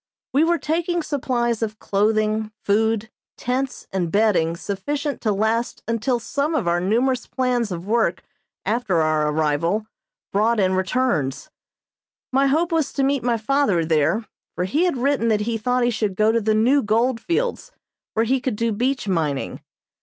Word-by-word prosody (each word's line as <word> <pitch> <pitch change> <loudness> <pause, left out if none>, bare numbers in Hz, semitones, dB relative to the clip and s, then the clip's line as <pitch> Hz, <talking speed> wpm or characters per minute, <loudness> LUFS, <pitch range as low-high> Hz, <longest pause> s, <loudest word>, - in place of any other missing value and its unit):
We 285 +4 +4
were 340 +1 +3
taking 340 +2 -1
supplies 240 -6 -1
of 215 -1 -2
clothing, 215 +1 0
food, 220 +2 +1 0.3
tents 255 +2 -2
and 175 -4 -1
bedding 180 -6 +2
sufficient 285 - -3
to 215 - +1
last 220 +4 -1
until 230 +2 0
some 285 +6 -1
of 235 - 0
our 175 0 +2
numerous 245 +6 +1
plans 245 -4 0
of 175 0 -5
work 220 -5 +1 0.4
after 205 -5 +1
our 155 -1 +1
arrival 160 +7 0 0.5
brought 220 +3 +2
in 190 -1 +2
returns. 185 - -1 0.8
My 275 +1 +4
hope 325 +5 +1
was 320 -3 +1
to 275 - 0
meet 275 -1 +1
my 235 -1 +1
father 220 - +1
there, 160 +7 +1 0.3
for 180 - -1
he 295 - +1
had 345 -7 0
written 265 -2 +1
that 215 -2 +2
he 230 +2 -1
thought 250 +3 0
he 240 - +2
should 210 -4 -1
go 215 +3 +3
to 230 0 +1
the 215 0 +1
new 255 +6 +4
gold 230 +3 +1
fields, 460 - -2 0.4
where 225 +1 +2
he 260 +2 +1
could 255 -4 -1
do 230 +2 0
beach 250 +3 -1
mining. 155 -7 -1
225 Hz, 170 wpm, -22 LUFS, 200-260 Hz, 0.8 s, We